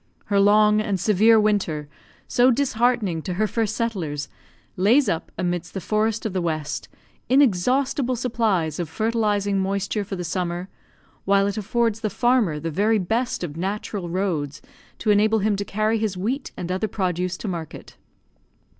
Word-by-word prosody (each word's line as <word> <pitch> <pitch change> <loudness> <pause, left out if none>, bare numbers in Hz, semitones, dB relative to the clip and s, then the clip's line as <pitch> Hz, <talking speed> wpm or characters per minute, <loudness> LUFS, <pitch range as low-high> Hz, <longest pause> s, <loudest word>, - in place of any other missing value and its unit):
Her 200 -1 +1
long 210 +1 +5
and 200 -3 -1
severe 215 +4 +5
winter, 195 -8 0 0.4
so 245 +1 +4
disheartening 240 - +1
to 180 +2 -4
her 215 +4 +1
first 220 +1 -1
settlers, 170 - -3 0.5
lays 235 +9 +4
up, 165 - -2
amidst 175 0 -3
the - - -1
forests 215 +4 0
of 215 - -2
the 185 - 0
West, 155 -3 -3 0.4
inexhaustible 255 +2 +2
supplies 220 - 0
of 170 -3 -3
fertilising 205 -1 0
moisture 200 +2 -1
for 195 0 -5
the 180 - -4
summer, 175 +2 -3 0.6
while 195 0 +3
it 200 - -1
affords 225 +1 0
the 220 -2 -1
farmer 240 -10 +2
the 165 +2 -4
very 210 +7 +2
best 225 +4 -1
of 150 -4 -5
natural 195 0 -3
roads 165 -6 -2 0.4
to 215 - +1
enable 215 +2 +4
him 210 0 +1
to 200 - -2
carry 215 +3 0
his 210 -4 -2
wheat 240 +10 -2
and 180 0 -4
other 190 +4 -1
produce 180 -2 -2
to 215 - -6
market. 170 -4 -6
205 Hz, 160 wpm, -23 LUFS, 180-225 Hz, 0.6 s, long